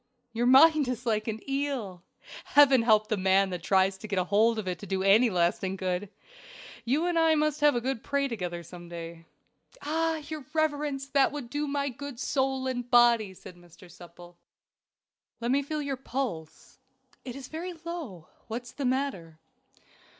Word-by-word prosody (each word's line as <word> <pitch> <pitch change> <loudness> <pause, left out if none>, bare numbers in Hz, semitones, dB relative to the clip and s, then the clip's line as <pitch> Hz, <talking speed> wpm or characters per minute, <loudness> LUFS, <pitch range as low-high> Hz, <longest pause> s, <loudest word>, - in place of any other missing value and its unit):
"Your 235 +1 0
mind 295 +2 +6
is 250 -1 -4
like 215 -1 0
an 220 +2 -5
eel 270 -10 -3 0.4
Heaven 275 -4 +6
help 215 -2 +3
the 215 - 0
man 190 0 +2
that 180 -1 -4
tries 190 +1 +2
to 215 - -8
get 200 -2 -3
hold 210 +5 +2
of 210 -3 -4
it 180 -1 -3
to 200 - -9
do 190 0 -1
it - - +1
any 225 +5 +6
lasting 185 +1 0
good. 185 +1 -3 0.7
You 285 +8 0
and 350 -2 +1
I 325 -1 +4
must 305 -1 0
have 295 -2 +5
a 240 - 0
good 260 -2 -3
pray 280 0 0
together 180 -8 -5
some 175 +1 -12
day." 165 -1 -9 0.6
"Ah! 325 +2 0
your 310 -2 -6
reverence, 295 -3 -1
that 275 -1 +3
would 275 -5 -7
do 295 +1 -2
me 280 -1 -1
good 280 -1 -8
soul 265 -1 -1
and 245 -2 -3
body," 235 -5 +4
said 180 - -12
Mr. 175 +1 -17
Supple. 175 0 -14 1.0
"Let 235 +1 -1
me 280 +2 +3
now 280 - -11
feel 305 -1 -3
your 275 -2 -3
pulse; 240 - -6 0.4
it 250 -2 -7
is 275 -2 -8
very 345 +3 -6
low. 325 - -8 0.2
What 235 +2 -4
is 240 - -12
the 280 - -5
matter?" 250 - -2
240 Hz, 185 wpm, -28 LUFS, 190-280 Hz, 1.0 s, mind